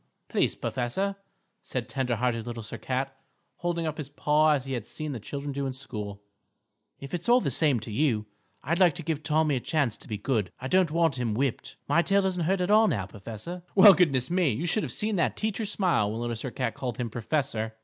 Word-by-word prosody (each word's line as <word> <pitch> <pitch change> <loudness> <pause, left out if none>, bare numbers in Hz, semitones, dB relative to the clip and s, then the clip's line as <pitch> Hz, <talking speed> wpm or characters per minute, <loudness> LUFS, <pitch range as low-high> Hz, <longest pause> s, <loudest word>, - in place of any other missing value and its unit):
"Please, - - +1
professor," 190 +11 -2 0.5
said 125 -2 -4
tender 125 -2 -1
hearted 115 -1 -1
Little 115 -1 -5
Sir 110 +2 -7
Cat, 135 +3 -2 0.4
holding 170 -1 -1
up 155 0 -3
his 145 -2 -5
paw 150 +1 +3
as 135 -3 -1
he 135 - -4
had 120 -4 -4
seen 155 -1 -4
the 125 - -4
children 140 +6 -5
do 140 0 -2
in 130 - -3
school, 105 -6 -7 0.8
"if 140 -1 -9
it's 175 +4 -3
all 245 +1 +7
the - - -1
same 145 -7 +3
to 115 - -6
you, 110 -3 +1 0.4
I'd 170 +6 0
like 180 -4 +5
to 170 - -6
give 155 -1 -2
Tommy 155 -2 +2
a - - -1
chance 140 -4 0
to - - -12
be 105 - -3
good. 105 -3 -1
I 130 - -4
don't 185 +3 +3
want 165 -4 +1
him 115 -4 -1
whipped. 135 0 -2
My 170 - +4
tail 200 +2 +2
doesn't 180 -3 0
hurt 190 +2 +1
at 180 +3 +1
all 215 +1 +6
now, 100 - 0
professor." 110 - -7
Well, 200 0 +10
goodness 140 -7 +2
me. 180 -3 +3
You 130 +10 -2
should 195 +5 +2
have - - -3
seen 210 -1 0
that 170 - +1
teacher 220 0 -1
smile 175 - +1
when 110 - -4
Little 120 0 -2
Sir 120 +4 -4
Cat 125 -1 -2
called 125 -4 -4
him 120 -3 -3
"professor." 115 -2 -2
140 Hz, 230 wpm, -27 LUFS, 120-170 Hz, 0.8 s, Well